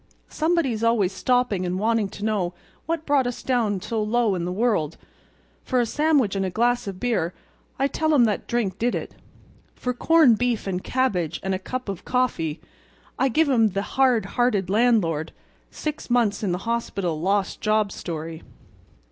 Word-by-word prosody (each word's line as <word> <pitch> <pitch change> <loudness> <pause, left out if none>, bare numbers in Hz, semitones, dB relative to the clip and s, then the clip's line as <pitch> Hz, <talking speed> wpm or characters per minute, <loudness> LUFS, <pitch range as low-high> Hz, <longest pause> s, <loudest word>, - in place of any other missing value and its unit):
Somebody's 310 -9 0
always 225 -5 +2
stopping 245 -2 +1
and 180 0 -2
wanting 220 0 +1
to 205 +2 -6
know 190 -5 -1 0.3
what 325 -1 -2
brought 280 -3 +2
us 245 - -5
down 225 -6 +1
so 220 +2 -2
low 220 0 +1
in 175 -2 -2
the 180 - -2
world. 185 -7 0 0.7
For 255 - 0
a 240 - +3
sandwich 290 -5 +2
and 195 - 0
a 190 - -1
glass 240 +3 +1
of 190 -2 -5
beer 190 -8 -1 0.4
I 275 - +2
tell 315 +2 0
'em 245 -4 +6
that 210 -2 -1
drink 215 -6 -1
did 240 +2 +1
it. - - -5 0.6
For 250 - -2
corned 275 -3 +4
beef 245 -2 0
and 185 -2 -3
cabbage 185 - 0
and 190 0 -1
a 185 - -1
cup 255 +6 -5
of 195 -3 -5
coffee 175 -12 -1 0.6
I 265 - +3
give 315 +5 +2
'em 235 -5 +4
the 195 +1 -1
hard 255 -4 +3
hearted 210 -7 0
landlord—six 220 - -1
months 235 -4 +2
in 200 -4 0
the 175 - 0
hospital 195 -8 -2
lost 195 +2 0
job 215 -1 +2
story. 165 -1 -6
220 Hz, 175 wpm, -24 LUFS, 190-250 Hz, 0.7 s, em